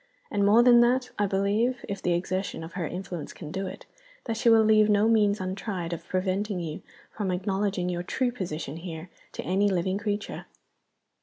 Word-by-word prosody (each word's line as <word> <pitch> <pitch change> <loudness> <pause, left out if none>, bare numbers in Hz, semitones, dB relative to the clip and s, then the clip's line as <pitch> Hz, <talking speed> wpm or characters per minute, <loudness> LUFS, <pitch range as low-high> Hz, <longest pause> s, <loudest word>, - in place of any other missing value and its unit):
And 205 -1 +1
more 215 +4 +6
than 240 -1 +7
that, 250 +1 +3
I 205 - +3
believe 205 +6 0
(if 200 -1 -4
the 175 - +1
exertion 185 0 -2
of 165 +1 -9
her 175 -4 -2
influence 180 -2 -6
can 155 -4 -9
do 190 +2 -3
it) - - -9 0.4
that 230 - -3
she 235 +1 +3
will 225 -1 +6
leave 215 0 +5
no 210 +1 +4
means 210 -2 +3
untried 185 -2 -3
of 170 +1 -7
preventing 190 +2 -1
you 160 -3 -5 0.3
from 205 -3 -3
acknowledging 190 0 -1
your 175 -1 -2
true 245 +7 -1
position 165 - -5
here 165 0 -7 0.2
to - - -5
any 195 +3 +2
living 185 +1 0
creature. 205 -1 -4
195 Hz, 185 wpm, -27 LUFS, 180-215 Hz, 0.4 s, than